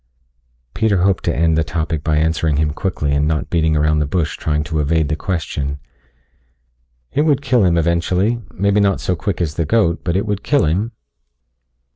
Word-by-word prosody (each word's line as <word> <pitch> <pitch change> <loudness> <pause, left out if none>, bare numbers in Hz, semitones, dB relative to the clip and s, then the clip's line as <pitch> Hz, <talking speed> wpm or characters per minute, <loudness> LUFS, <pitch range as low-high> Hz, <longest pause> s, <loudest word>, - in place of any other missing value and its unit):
Peter 100 -5 +1
hoped 95 -1 +1
to 85 - 0
end 80 0 +2
the 80 - +2
topic 80 -1 -3
by 75 -1 +1
answering 80 -1 +1
him 75 0 0
quickly 75 -5 -2
and 70 +1 +1
not 80 -1 -2
beating 80 -2 +2
around 75 +1 +2
the 75 - 0
bush 80 0 -1
trying 75 -1 -1
to 80 0 -3
evade 80 +1 +1
the 75 - 0
question. 75 -6 -3 1.3
"It 145 - +1
would 145 -3 +2
kill 125 -6 +3
him 85 -2 +3
eventually. 90 +7 +1
Maybe 100 +2 +1
not 100 -1 +2
so 90 - -1
quick 100 +1 -3
as 80 -4 -1
the 80 +1 -1
goat, 85 -2 +1
but 85 -1 -1
it 100 +3 0
would 105 -2 -2
kill 145 - +2
him." 95 +9 0
85 Hz, 190 wpm, -18 LUFS, 75-100 Hz, 1.3 s, kill